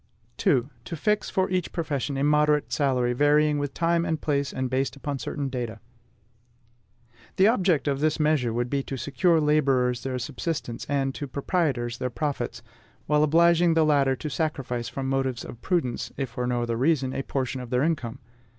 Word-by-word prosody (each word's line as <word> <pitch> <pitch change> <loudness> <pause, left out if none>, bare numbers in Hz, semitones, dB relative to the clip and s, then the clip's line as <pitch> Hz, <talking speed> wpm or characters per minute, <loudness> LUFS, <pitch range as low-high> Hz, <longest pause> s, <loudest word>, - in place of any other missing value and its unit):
2. 125 0 +2 0.2
TO 125 - -6
FIX 210 +7 0
FOR 190 0 +1
EACH 180 -2 -1
PROFESSION 145 -4 -2
A 135 - 0
MODERATE 150 0 +2
SALARY, 125 -4 +1
VARYING 145 +2 +3
WITH 145 -1 -3
TIME 170 0 +2
AND 160 -2 -1
PLACE 140 -2 -1
AND 130 0 -2
BASED 130 +2 -1
UPON 140 0 -4
CERTAIN 140 +1 -3
DATA. 120 -4 -4 1.6
The 190 - +4
object 185 - +2
of 140 -1 0
this 155 +2 +1
measure 150 -6 +2
would 120 +2 -1
be 140 +2 -1
to 135 0 -6
secure 165 +7 +2
to 155 -2 +2
laborers 135 -5 +2
their 130 -1 -3
subsistence, 130 -1 -4
and 135 -1 0
to 145 - -5
proprietors 135 -5 -1
their 125 - -1
profits, 125 -3 -3 0.4
while 150 0 +3
obliging 170 +2 +4
the 160 -1 +4
latter 140 -3 +3
to 155 - -6
sacrifice 130 -5 -2
from 135 -1 -4
motives 130 -2 -1
of 120 - -10
prudence, 165 -10 -1
if 135 -3 -3
for 125 0 -3
no 120 -1 0
other 115 -1 -2
reason, 135 -1 +1
a - - -2
portion 130 -1 -3
of 125 - -8
their 125 +1 +1
income. 135 -7 -1
140 Hz, 185 wpm, -26 LUFS, 125-155 Hz, 1.6 s, The